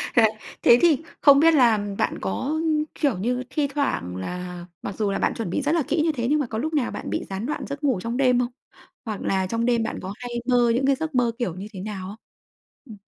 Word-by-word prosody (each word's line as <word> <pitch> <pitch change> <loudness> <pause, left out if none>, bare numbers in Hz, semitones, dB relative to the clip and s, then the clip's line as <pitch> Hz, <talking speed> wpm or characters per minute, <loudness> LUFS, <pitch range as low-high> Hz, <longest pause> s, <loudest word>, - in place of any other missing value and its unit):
Thế 240 - +7
à, - - +8 0.3
thế 235 - +7
thì 325 -4 +4 0.2
không 280 -1 +7
biết 325 +2 +6
là 240 -7 +5 0.2
bạn - - 0
có, 265 - -2 0.4
kiểu 280 - +1
như, 245 +6 -1
thi 295 -3 0
thoảng 275 - -2
là 180 - -6 0.2
mặc 200 - -5
dù 210 -2 0
là 195 - -1
bạn - - +1
chuẩn 225 -6 -4
bị 185 - -1
rất 290 +1 0
là 330 - +2
kỹ 315 +2 +1
như 325 - +2
thế, 240 -5 -2
nhưng 300 +1 +3
mà 290 - 0
có 220 - -4
lúc 315 +8 -2
nào 285 -6 +1
bạn - - -6
bị - - -2
gián 195 +3 -4
đoạn 300 - -3
giấc 280 +1 -6
ngủ 260 -9 +2
trong 230 +4 -3
đêm 250 -2 +3
không? 245 0 -1 0.5
Hoặc 215 -3 -4
là 190 -1 0
trong 230 +4 -1
đêm 240 -2 +2
bạn - - -4
có 190 +1 -5
hay 245 -1 -6 0.2
mơ 245 -2 +4
những 265 +2 +1
cái 275 0 +4
giấc 315 +1 -4
mơ 245 -2 +3
kiểu 185 -9 -2
như 190 +3 -7
thế 190 - -7
nào 195 -1 -5
không? 205 - -8 0.7
Ừm. 220 -6 -11
240 Hz, 260 wpm, -24 LUFS, 200-280 Hz, 0.7 s, à